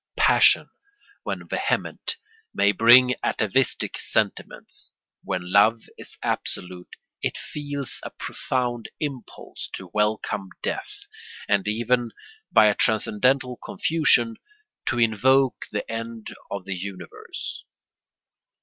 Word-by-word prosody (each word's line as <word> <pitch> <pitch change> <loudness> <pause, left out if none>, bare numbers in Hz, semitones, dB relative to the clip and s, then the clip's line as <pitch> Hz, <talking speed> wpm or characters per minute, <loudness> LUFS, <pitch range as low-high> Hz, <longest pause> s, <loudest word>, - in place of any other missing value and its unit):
Passion, - - +5 0.5
when - - -5
vehement, - - -2 0.4
may 100 +1 +4
bring 120 +5 +7
atavistic 120 +4 0
sentiments. - - -3 0.3
When 90 0 -4
love 110 +3 +5
is - - -12
absolute 90 0 -3 0.3
it - - -2
feels 145 -2 -5
a - - -6
profound 120 -3 -3
impulse 140 -6 -6
to 95 -2 -8
welcome 105 -2 0
death, 410 +1 -4 0.4
and 100 -1 +1
even, 120 +2 0 0.4
by 110 - +7
a 105 - +5
transcendental 125 +4 +2
confusion, 155 - +2 0.5
to 120 - 0
invoke 125 +4 +3
the 105 - -3
end 115 0 -6 0.2
of 100 -2 -5
the 100 - -3
universe. 90 -1 -7
115 Hz, 105 wpm, -24 LUFS, 100-130 Hz, 0.5 s, bring